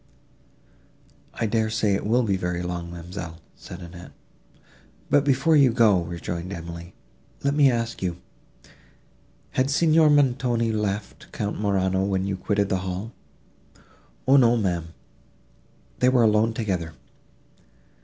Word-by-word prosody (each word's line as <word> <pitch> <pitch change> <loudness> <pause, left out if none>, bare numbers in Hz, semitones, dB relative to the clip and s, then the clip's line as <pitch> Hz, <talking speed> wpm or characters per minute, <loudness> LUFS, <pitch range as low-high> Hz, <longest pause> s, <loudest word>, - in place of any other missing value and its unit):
"I 115 - -1
dare 110 0 0
say 110 -2 +1
it 100 - -2
will 120 +3 +3
be 100 -4 +1
very 90 -1 -3
long, 90 -1 -4
ma'amselle," 85 0 -8 0.2
said 90 +1 -11
Annette. 85 0 -11 1.0
"But, 145 -1 +4
before 140 +3 +3
you 140 -4 +5
go," 110 -6 +4
rejoined 85 +1 -5
Emily, 85 0 -8 0.5
"let 140 0 +1
me 145 -2 +5
ask 115 -1 -2
you—Had 90 +7 -7
Signor 155 +1 +4
Montoni 125 -5 +2
left 105 -1 -4
Count 105 0 -4
Morano, 95 -2 +1
when 95 -1 -1
you 100 -1 -2
quitted 100 +1 -1
the 95 - +1
hall?" 95 +4 -5 1.2
"O 135 +2 +6
no, 120 -2 +5
ma'am, 90 -6 -1 1.1
they 125 - +4
were 125 -2 +4
alone 110 +1 +3
together." 90 -8 -2
100 Hz, 125 wpm, -24 LUFS, 90-120 Hz, 1.2 s, O